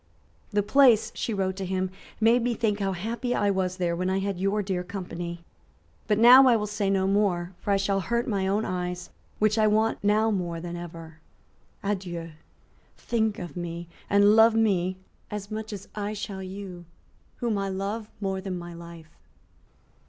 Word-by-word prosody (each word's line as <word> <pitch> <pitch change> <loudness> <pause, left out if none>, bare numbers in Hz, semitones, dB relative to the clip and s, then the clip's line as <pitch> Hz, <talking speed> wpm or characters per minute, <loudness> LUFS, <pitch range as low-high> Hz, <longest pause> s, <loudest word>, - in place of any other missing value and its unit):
"The 205 -2 +1
place," 225 -2 +5
she - - -3
wrote 190 -3 -1
to 195 - -3
him, 185 0 -1 0.3
"made 230 +2 +4
me 240 0 0
think 215 -3 0
how 195 -1 0
happy 230 +6 -2
I 205 -1 +2
was 185 -1 -1
there 175 -2 0
when 185 +2 -1
I 190 - +1
had 195 -1 -2
your 200 +2 +1
dear 185 -2 -2
company. 175 -2 -6 0.6
But 210 -2 +2
now 250 +4 +9
I 245 - +6
will 210 -2 0
say 205 -1 -1
no 190 -1 +2
more; 190 -3 +1
for - - -6
I 200 - +4
shall 195 0 +1
hurt 235 +6 -1
my 195 -4 0
own 205 +3 +1
eyes, 180 -1 -4 0.3
which 215 +1 +2
I 215 - +5
want 220 +1 +1
now 215 +2 +3
more 175 -4 -2
than 175 +1 -6
ever. 165 -2 -9 0.6
Adieu. 180 -5 -3 0.7
Think 220 -3 0
of 175 -5 -7
me, 170 -1 -5 0.2
and 205 +1 +5
love 225 0 +6
me 185 -5 +2 0.3
as 205 -1 -6
much 220 0 -5
as 200 -1 -7
I 210 0 -3
shall 200 -2 -5
you, 185 -2 -8 0.5
whom 230 -4 -1
I 195 0 -2
love 200 +3 -3
more 195 -2 -2
than 190 -1 -4
my 175 0 -8
life." 170 -2 -11
195 Hz, 180 wpm, -26 LUFS, 180-215 Hz, 0.7 s, now